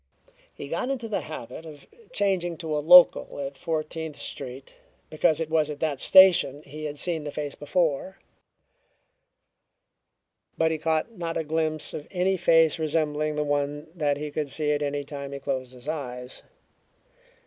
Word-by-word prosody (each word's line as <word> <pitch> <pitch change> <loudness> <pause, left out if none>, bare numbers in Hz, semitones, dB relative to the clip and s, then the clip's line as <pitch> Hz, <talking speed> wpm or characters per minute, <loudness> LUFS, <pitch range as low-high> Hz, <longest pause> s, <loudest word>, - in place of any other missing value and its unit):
He 140 - -9
got 170 - -2
into 250 -4 -3
the 215 - -2
habit 155 -2 -8
of 155 -3 -12 0.3
changing 185 -4 0
to 160 -2 -3
a - - +1
local 175 -1 +6
at 140 0 -5
Fourteenth 160 0 -4
Street 130 -1 -8 0.4
because 155 0 +2
it 165 - -2
was 155 -2 +2
at 145 -1 -6
that 150 -4 -1
station 175 -7 +6
he 155 +2 -8
had 145 -1 -5
seen 165 -1 -1
the 150 - -4
face 145 -1 -4
before, 165 +3 -1 2.4
but 160 0 +2
he 160 - -2
caught 160 +6 0
not 165 -1 -3
a 160 - -1
glimpse 155 0 -1
of 150 - -7
any 185 +1 +1
face 165 -3 +4
resembling 155 -1 0
the 150 - 0
one 145 +1 -2
that 150 -4 0
he 150 0 -5
could 150 -1 -3
see 150 +1 -1
at 145 0 0
any 145 0 -2
time 140 -1 -7
he 140 - -5
closed 130 -2 -4
his 125 +2 -12
eyes. 125 -5 -5
155 Hz, 165 wpm, -26 LUFS, 145-165 Hz, 2.4 s, local